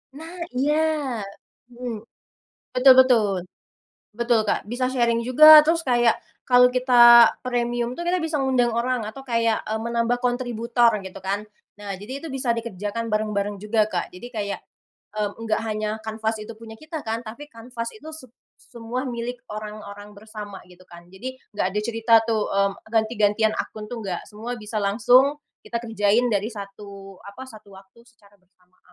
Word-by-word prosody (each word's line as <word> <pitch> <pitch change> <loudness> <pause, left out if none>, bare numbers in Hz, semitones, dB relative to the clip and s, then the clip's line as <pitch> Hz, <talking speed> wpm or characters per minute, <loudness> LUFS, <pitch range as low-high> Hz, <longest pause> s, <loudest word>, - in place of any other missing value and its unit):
Nah, 330 +4 -10 0.2
iya 290 +4 +1 0.9
mhm, 245 -1 -6 0.8
betul 255 +1 +7
betul, 250 -5 +5 0.9
betul 235 +1 +1
Kak, 205 - -2
bisa 245 +2 -1
sharing 235 -2 +1
juga. 305 +4 +9
Terus 330 +1 +2
kayak, 240 -4 +2 0.2
kalau 250 0 +6
kita 240 -2 +7
premium 240 0 -2
tuh, 345 - -5
kita 355 +1 0
bisa 320 -2 -2
ngundang 255 -3 +2
orang 245 +1 0
atau 270 +4 -11
kayak, 230 -3 0
eee, 220 +1 -3
menambah 235 +1 0
kontributor 240 -1 +1
gitu 190 -1 -9
kan. 195 +2 -2 0.4
Nah, 200 -1 -5
jadi 255 +8 -8
itu 330 - -7
bisa 260 -3 -1
dikerjakan 230 0 -4
bareng-bareng 210 -1 -1
juga, 210 +1 0
Kak. 180 -3 -4
Jadi 180 +7 -9
kayak, 205 -4 -4 0.6
mmm, 205 -1 -1
enggak 220 -1 -1
hanya 215 -1 -2 0.2
Canvas 220 0 -2
itu 230 +2 -9
punya 220 0 -12
kita 310 +1 -7
kan, 225 +1 -3
tapi 285 +7 -10
Canvas 230 0 -7
itu 315 -7 -11
sep 255 -7 -11 0.3
semua 240 +3 -6
milik 240 0 -5
orang-orang 210 -1 -8
bersama 210 -1 -9
gitu 180 0 -18
kan. 175 -1 -15
Jadi, 255 +8 -8 0.2
nggak 205 - 0
ada 210 - 0
cerita 225 +1 -1
tuh, 220 -2 +1
mmm, 200 0 +1 0.2
ganti-gantian 220 -1 +2
akun 215 -1 -5
tuh, 240 -2 -6
nggak, 180 -3 -5
semua 225 +3 -6
bisa 215 +1 -6
langsung 245 +8 +3 0.3
kita 235 - -3
kerjain 225 +1 +1
dari 210 0 0
satu 200 -1 -10
apa 200 +6 -10
satu 215 -3 -15
waktu 195 +4 -19
secara 205 -4 -24
bersamaan. 180 0 -36
230 Hz, 160 wpm, -23 LUFS, 210-245 Hz, 0.9 s, juga